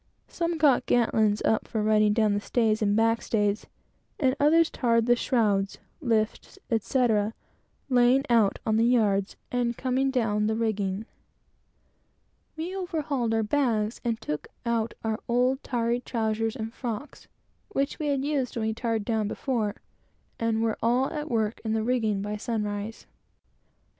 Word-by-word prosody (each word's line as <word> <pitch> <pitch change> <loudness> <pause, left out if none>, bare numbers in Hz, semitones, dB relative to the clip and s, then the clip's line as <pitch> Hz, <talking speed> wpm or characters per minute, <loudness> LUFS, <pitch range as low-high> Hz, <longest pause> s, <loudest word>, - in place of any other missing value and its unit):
Some 335 -1 -2
got 295 -5 +3
girt 240 -2 +2
lines 215 -1 +2
up 220 - +1
for 215 -2 -2
riding 215 0 +4
down 215 -1 +2
the 205 - +1
stays 220 -1 +1
and 205 -1 +2
back 225 +1 +2
stays, 205 -1 0 0.5
and 265 -2 +2
others 320 +3 +4
tarred 230 -2 +2
the 240 0 +4
shrouds, 205 -6 +1 0.2
lifts, 225 - -1
etc., 225 -2 +1 0.5
laying 250 +1 +4
out 230 -4 +3
on 220 -1 +2
the 225 - +3
yards, 210 -5 +2 0.2
and 240 -1 0
coming 260 +1 0
down 215 -5 +1
the 220 - 0
rigging. 210 -2 -1 1.5
We 345 +4 -4
overhauled 305 - -2
our 225 - +1
bags 225 -3 0
and 230 -2 -1
took 150 -9 -4 0.2
out 230 -1 -1
our 220 -1 -1
old 250 +3 +2
tarry 235 -1 0
trowsers 225 -2 -1
and 225 0 -5
frocks, 245 +3 -6 0.4
which 275 -8 -1
we 305 - -2
had 275 -1 0
used 280 -4 -1
when 220 - -1
we - - -1
tarred 225 -2 -2
down 220 -3 0
before, 215 -3 -2 0.6
and 225 -1 0
were 225 -1 -1
all 245 +4 +2
at 300 0 -4
work 220 -2 -1
in 220 -1 -1
the 220 -1 0
rigging 220 -5 0
by 210 +1 -3
sunrise. 210 -1 -4
230 Hz, 155 wpm, -27 LUFS, 215-250 Hz, 1.5 s, riding